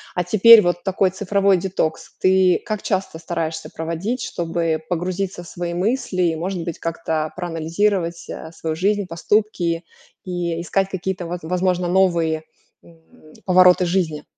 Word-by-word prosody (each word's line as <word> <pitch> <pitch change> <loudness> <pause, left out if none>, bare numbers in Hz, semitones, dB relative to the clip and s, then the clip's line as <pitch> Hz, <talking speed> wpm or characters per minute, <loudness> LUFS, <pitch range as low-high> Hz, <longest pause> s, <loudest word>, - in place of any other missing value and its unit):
А 180 - +1
теперь 215 +4 +8
вот 175 0 -1
такой 190 -1 +1
цифровой 195 0 +2
детокс. 175 -3 -2
Ты 185 -1 +3
как 215 -3 -3
часто 190 -4 -2
стараешься 160 -1 -4
проводить, 170 +10 -3
чтобы 165 -2 -2
погрузиться 180 +1 -3
в - - -13
свои 175 0 -5
мысли 205 0 -1
и, 165 -2 +1
может 180 +1 -3
быть, 165 -1 -5
как-то 160 -2 -2
проанализировать, 170 +1 -1
а, 160 - -7
свою 160 -1 -4
жизнь, 200 +3 0
поступки 175 -1 0 0.4
и 175 -2 -3
искать 195 +2 0
какие-то, 190 -1 -3
воз 175 +1 -4
возможно, 180 +1 0
новые 170 -4 +2 0.4
н 160 -2 -20
повороты 180 -1 +5
жизни? 170 -4 -1
180 Hz, 140 wpm, -21 LUFS, 165-190 Hz, 0.4 s, теперь